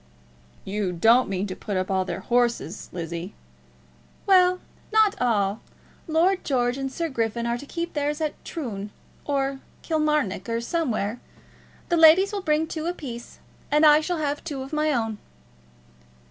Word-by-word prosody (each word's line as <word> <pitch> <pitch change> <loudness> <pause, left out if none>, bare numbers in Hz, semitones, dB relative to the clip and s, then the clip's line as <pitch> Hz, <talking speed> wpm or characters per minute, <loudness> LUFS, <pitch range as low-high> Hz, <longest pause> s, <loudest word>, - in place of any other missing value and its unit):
"You 195 -2 -2
don't 225 +8 +4
mean 195 0 -1
to 185 -2 -5
put 205 -3 -4
up 185 +1 -1
all 190 -1 +1
their 195 - -4
horses, 235 -6 0
Lizzie?" 170 +2 -5 0.9
"Well, 365 -1 +5 0.3
not 435 -2 +5
all. 210 -4 +1 0.5
Lord 345 +4 +2
George 245 -3 +1
and 270 0 -4
Sir 335 +5 -2
Griffin 235 -4 -2
are 235 0 0
to 285 - -10
keep 340 +2 -4
theirs 295 0 -1
at 310 -2 -1
Troon, 210 - -5 0.4
or 275 -1 -1 0.2
Kilmarnock, 300 - 0
or 230 0 0
somewhere. 235 -5 -1 0.7
The 345 - +2
ladies 330 +5 +7
will 405 - -2
bring 310 -2 +1
two 320 0 -4
apiece, 255 -9 -6 0.3
and 300 +1 +4
I 300 0 +7
shall 350 +2 -2
have 290 -1 -2
two 285 -5 -4
of 270 - -10
my 305 0 +1
own." 225 -5 -1
270 Hz, 155 wpm, -25 LUFS, 215-315 Hz, 0.9 s, ladies